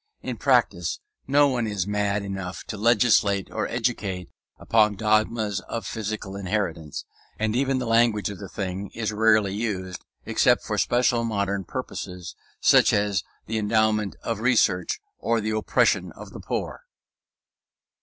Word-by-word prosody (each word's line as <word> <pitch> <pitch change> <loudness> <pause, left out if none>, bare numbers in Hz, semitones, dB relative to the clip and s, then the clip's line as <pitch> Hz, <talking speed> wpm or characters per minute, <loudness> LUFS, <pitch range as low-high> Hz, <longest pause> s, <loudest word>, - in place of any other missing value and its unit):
In - - -4
practice - - +1 0.3
no 145 +1 +5
one 125 -4 0
is 100 -4 -1
mad 105 0 0
enough 95 -2 -5
to - - -6
legislate 105 -3 +3
or - - -2
educate 105 -7 -2 0.3
upon 110 -2 +3
dogmas 110 0 +1
of 115 -4 -4
physical 105 -3 -4
inheritance; 95 -6 -3 0.3
and 110 +1 -1
even 135 +1 +1
the 125 - -2
language 115 -2 +3
of 100 - -9
the 100 -3 -8
thing 95 0 -4
is 115 -2 -2
rarely 110 -2 +3
used 95 -4 -3 0.2
except - - +3
for - - -2
special 120 -1 +2
modern 100 -3 -1
purposes, 90 0 -6 0.2
such - - +5
as 100 -4 +1 0.2
the 110 0 -2
endowment 105 -1 +1
of 115 -2 -2
research 110 - +2 0.2
or 115 0 +1
the 110 0 -2
oppression 110 -1 +1
of - - -11
the - - -9
poor. - - -4
105 Hz, 145 wpm, -25 LUFS, 100-115 Hz, 0.3 s, no